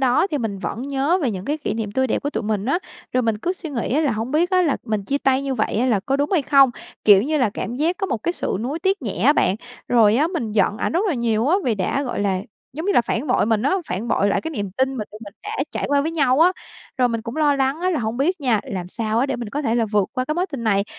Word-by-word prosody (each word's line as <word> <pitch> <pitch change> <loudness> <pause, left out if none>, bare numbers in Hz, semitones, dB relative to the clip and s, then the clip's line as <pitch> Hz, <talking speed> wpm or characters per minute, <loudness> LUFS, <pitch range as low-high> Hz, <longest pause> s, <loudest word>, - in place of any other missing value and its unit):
đó 260 +6 +3
thì 295 - 0
mình 220 -5 -3
vẫn 230 +4 -4
nhớ 280 +6 +1
về 255 - +1
những 185 -2 -5
cái 295 +5 -1
kỷ 220 -8 -3
niệm 215 -3 -3
tươi 260 +2 +1
đẹp - - -1
của 290 - -1
tụi - - -3
mình 210 -2 -1
á. 280 +6 +2 0.3
Rồi 255 - +2
mình 225 -2 0
cứ 350 +11 -1
suy 345 -4 -8
nghĩ 245 -2 -2
á 300 - +3
là 295 -5 +2
"Hông 225 +4 -3
biết 335 +5 +2
á 370 -1 +4
là 300 -5 +1
mình 215 -4 -2
chia 280 +5 0
tay 265 0 +2
như 270 -1 -2
vậy 215 -3 -1
á 255 - +2
là 220 -6 +2
có 270 +7 -1
đúng 285 +4 0
hay 335 -7 +3
không?". 275 -2 +5 0.3
Kiểu 200 -2 +7
như 305 +5 0
là, 250 -6 +2
cảm 220 +3 -5
giác 325 +6 +1
có 390 -2 -2
một 225 - -3
cái 345 - 0
sự 275 - -2
nuối 275 +7 -3
tiếc 385 0 0
nhẹ 215 -6 -2
á 290 - +7
bạn, 200 -9 +2 0.3
rồi 225 -3 +5
á 295 +5 +3
mình 265 - -3
giận 205 0 +2
ảnh - - -2
rất 360 +6 +1
là 345 - +1
nhiều 230 -1 0
á, 365 - +4
vì 235 -4 +1
đã, 200 +8 -1
gọi 245 -6 -3
là, 195 -2 0 0.3
giống 315 +7 -5
như 405 - +3
là, - - +5
phản 235 +3 -2
bội 250 -5 +2
mình 220 -1 +1
á, 380 - +2
phản 195 +6 -3
bội 200 -2 +2
lại 200 - +1
cái 320 - -5
niềm 205 -10 -4
tin 265 +1 +1
mà - - -6
mình 210 - -3
tụi 215 - -10
mình 200 - -10
đã 420 - -6 0.2
trải - - -3
qua 285 0 +3
với 315 +3 -1
nhau 275 -4 +2
á. 355 +3 +6 0.5
Rồi 250 - +4
mình 230 -1 -2
cũng 230 +5 -6
lo 295 -2 +3
lắng 275 +4 0
á 370 - +1
là 330 - 0
hông 220 +1 -2
biết 330 +7 0
nha, 240 -7 +2
làm 180 -2 -5
sao 220 +3 -1
á 265 - +2
để 270 -3 -2
mình 235 -3 -5
có 290 +6 -3
thể 230 -3 0
là 235 - +2
vượt 205 -2 +2
qua 255 - -1
cái 305 - -2
mối 355 +3 0
tình 275 -9 -6
này, 200 -2 +2
255 Hz, 320 wpm, -22 LUFS, 220-300 Hz, 0.5 s, Kiểu